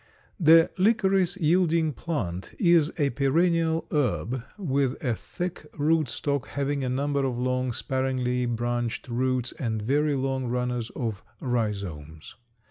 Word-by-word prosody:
_ - - -31 0.4
The 165 -1 +6
licorice 195 -3 +3
yielding 165 -2 +2
plant 95 - -4
is 170 -4 +4
a 145 -4 +1
perennial 165 +4 +2
herb 130 -4 0
with 140 -8 0
a 120 - +2
thick 175 - -6
root 155 -1 +2
stock, 140 -1 -2
having 140 0 -2
a 130 - -1
number 140 +2 0
of 130 -3 -1
long 125 0 0
sparingly 125 0 -1
branched 120 0 -2
roots 125 0 0
and 115 -5 -3
very 145 +7 +1
long 135 -1 -1
runners 125 -1 -2
or 115 -4 -2 0.2
rhizomes. 100 - -3
135 Hz, 130 wpm, -26 LUFS, 120-160 Hz, 0.4 s, The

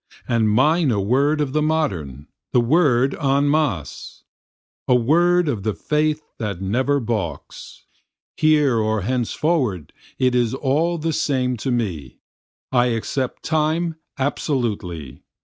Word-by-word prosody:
And 115 -3 +2
mine 150 +8 +3
a 110 -4 +1
word 140 +9 +1
of 140 -3 -2
the 155 - +1
modern, 95 - -1 0.3
the - - +5
word 135 0 +3
En 140 0 +2
Masse. 140 - -2 0.6
A 125 - +4
word 170 +8 +3
of 120 -8 -1
the 105 +1 -2
faith 155 0 0 0.2
that 105 -6 -3
never 130 +9 0
balks, 110 - -5 0.5
Here 150 -6 +3
or 110 -1 0
henceforward 125 - -1 0.2
it 130 -1 +2
is 120 0 +1
all 155 +6 0
the 165 0 -2
same 130 -4 0
to 130 - -4
me, 95 - -3 0.5
I 125 -1 +3
accept 125 +2 -3
Time 160 +2 0 0.2
absolutely. 105 - -3
130 Hz, 130 wpm, -21 LUFS, 110-150 Hz, 0.6 s, the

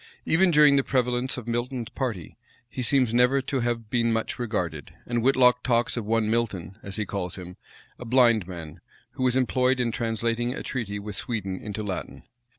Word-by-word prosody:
Even 180 +3 +4
during 150 -3 +6
the 135 - +3
prevalence 125 -1 0
of 120 -2 -7
Milton's 120 0 -2
party, 115 - -4 0.3
he 125 +2 -6
seems 125 -2 +2
never 125 +3 +4
to 135 0 -2
have 120 -2 -2
been 115 -1 +2
much 115 +2 -2
regarded, 90 - -3
and 120 0 -1
Whitlocke 125 -1 +4
talks 120 -1 +1
of 115 -3 -3
one 110 0 +1
Milton, 105 -6 -1
as 100 0 -6
he 105 - -1
calls 95 -4 -4
him, 90 -1 -9 0.4
a 125 - -7
blind 115 -5 +4
man, 85 -4 -9 0.3
who 130 +2 -8
was 130 -1 +2
employed 130 0 +2
in 120 -2 +1
translating 115 +1 -1
a - - -6
treaty 110 -6 -3
with 100 0 -7
Sweden 95 -5 -3
into 105 0 -5
Latin. 95 -3 -5
120 Hz, 185 wpm, -26 LUFS, 105-125 Hz, 0.4 s, during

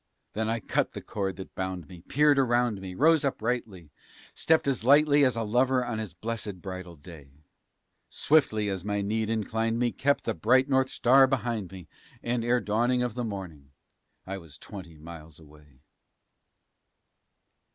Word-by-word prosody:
Then 110 +1 -1
I 115 0 0
cut 105 - -1
the - - -6
cord 95 -3 -3
that 95 +1 -10
bound 95 -4 -4
me, 90 0 -12
peered 145 - +3
around 120 -5 +1
me, 95 -1 -7
rose 160 - +4
uprightly, 110 - -3 0.4
Stepped 160 -3 +2
as 135 -5 -1
lightly 145 +2 +5
as 130 -3 +3
a 115 - -1
lover 125 +3 +1
on 115 -2 -3
his 110 -4 -5
blessed 105 -1 -5
bridal 95 -1 -8
day; 75 -2 -15 0.7
Swiftly 110 -9 +2
as 95 -3 -3
my 100 0 -2
need 110 +2 -1
inclined 115 +1 -1
me, 120 0 +1
kept 140 +1 0
the - - -1
bright 130 - +3
North 130 -1 +2
Star 135 +2 +5
behind 120 -7 -2
me, 90 -4 -11 0.4
And, 120 0 -1
ere 120 +1 +2
dawning 120 +4 +1
of 125 -3 -2
the 125 +1 -3
morning, 90 - -7 0.5
I 95 +1 -5
was 80 -5 -14
twenty 90 -5 -11
miles 80 0 -11
away. 75 -3 -19
110 Hz, 160 wpm, -27 LUFS, 90-125 Hz, 0.7 s, lightly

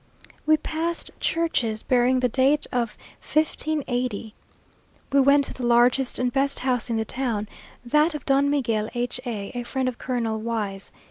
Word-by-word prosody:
We 310 0 +6
passed 325 +2 -3
churches 245 -10 0
bearing 255 0 +3
the 250 - +3
date 275 +4 +3
of 240 -3 -1 0.2
1580! 255 -8 -1 0.8
We 280 - +4
went 280 +1 +5
to - - -5
the 255 - -7
largest 245 +2 +3
and 250 -1 0
best 275 0 +1
house 250 -2 0
in 230 - 0
the 220 - -1
town, 230 -4 -2 0.4
that 300 +6 +3
of 295 - -6
Don 275 +1 +3
Miguel 230 -7 0
H 245 +1 -2
a 205 -4 -4
(a 245 - -3
friend 260 +2 -2
of 250 -2 -3
Colonel 230 -4 -2
Y 220 -3 -2
's). 195 - -5
250 Hz, 170 wpm, -24 LUFS, 235-280 Hz, 0.8 s, We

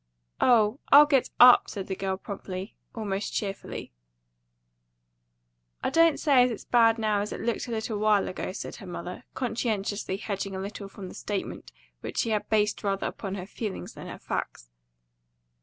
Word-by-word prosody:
"Oh, 235 0 +4
I'll 290 +1 +10
get 275 -4 +2
UP!" 245 0 +8
said 195 -3 -5
the 190 - -4
girl 190 0 -2
promptly, 195 0 -7 0.2
almost 205 -3 -3
cheerfully. 195 -2 -4 1.9
"I - - 0
don't 330 -1 +4
say 280 -5 +5
it's 250 - +1
as 225 - -7
bad 230 -2 +4
now 215 -2 +1
as 210 - -4
it - - -5
looked 235 +1 -2
a - - -6
little 220 -1 -2
while 210 -2 +3
ago," 185 - -4
said - - -7
her 195 - -10
mother, 175 0 -7
conscientiously 215 -5 -2
hedging 195 -2 -4
a - - -4
little 200 +1 -6
from 195 -1 -9
the - - -10
statement 205 -2 -5 0.3
which - - -7
she 230 - +1
had 210 -1 -1
based 210 -1 +1
rather 195 -1 -1
upon 195 -2 -4
her 185 -2 -6
feelings 210 0 -6
than - - -9
her - - -7
facts. - - -5
210 Hz, 175 wpm, -27 LUFS, 195-230 Hz, 1.9 s, I'll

